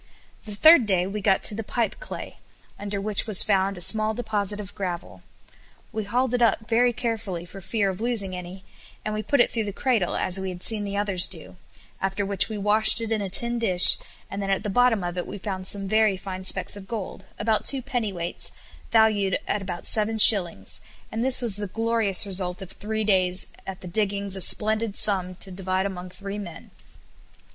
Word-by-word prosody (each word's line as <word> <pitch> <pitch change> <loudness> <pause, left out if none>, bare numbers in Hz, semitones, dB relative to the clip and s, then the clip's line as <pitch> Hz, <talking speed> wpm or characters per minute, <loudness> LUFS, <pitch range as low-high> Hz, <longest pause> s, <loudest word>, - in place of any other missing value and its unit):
The 210 -2 -8
third 315 0 +6
day 185 -3 0
we 205 +2 -6
got 195 -1 +1
to - - +6
the 225 +2 -5
pipe 230 +1 -3
clay, - - -9 0.4
under 200 0 -5
which 210 +2 -1
was 210 -4 +5
found 195 -1 0
a - - -7
small 215 +4 +2
deposit 210 -3 -3
of 200 -1 -9
gravel. 175 - -7 0.7
We 220 -1 -5
hauled 250 +4 -1
it 245 - -1
up 225 -1 +1
very 240 +1 +2
carefully 220 -7 -5
for 195 +2 -12
fear 200 +2 -2
of 190 +1 -5
losing 220 -6 -1
any, 180 +1 -10 0.4
and 215 - -3
we 215 - -3
put 280 +6 -1
it 240 - +3
through 225 -2 -3
the 205 - -5
cradle, 220 -4 -1
as 185 +1 0
we 190 0 -5
had 180 -1 -5
seen 215 -2 +5
the 200 0 -5
others 195 -3 +2
do, 90 - -9 0.5
after 195 +1 -2
which 195 +1 0
we 215 - -6
washed 210 +2 +4
it 225 -1 -5
in 220 -2 -1
a 195 - -5
tin 235 +5 0
dish, 185 -6 +8 0.3
and 200 - -7
then 195 - -4
at 195 - -1
the 210 - -4
bottom 240 -2 +2
of 175 0 -5
it - - -6
we - - -8
found 190 -1 -4
some 195 -1 +3
very 215 -1 +1
fine 185 0 -8
specks - - +2
of 195 -1 -11
gold, 200 -3 -7
about 215 0 -1
two 270 -2 +2
pennyweights, 210 -10 -2 0.4
valued 215 -4 +2
at 210 - -2
about 180 -2 -7
seven 220 0 +3
shillings, 175 - +5 0.3
and 225 +1 -3
this 260 0 +3
was 215 -5 0
the 205 -1 -5
glorious 225 -1 -1
result 185 -2 -3
of 190 - -11
three 220 +1 -4
days 185 -3 +1 0.2
at 190 -1 -8
the 180 - -9
diggings 200 +1 -2
a 190 - -1
splendid 215 +2 +3
sum 185 -3 0
to 190 +1 -3
divide 185 0 -3
among 185 -2 -7
three 200 +2 -8
men. 175 -5 -11
200 Hz, 205 wpm, -23 LUFS, 190-220 Hz, 0.7 s, dish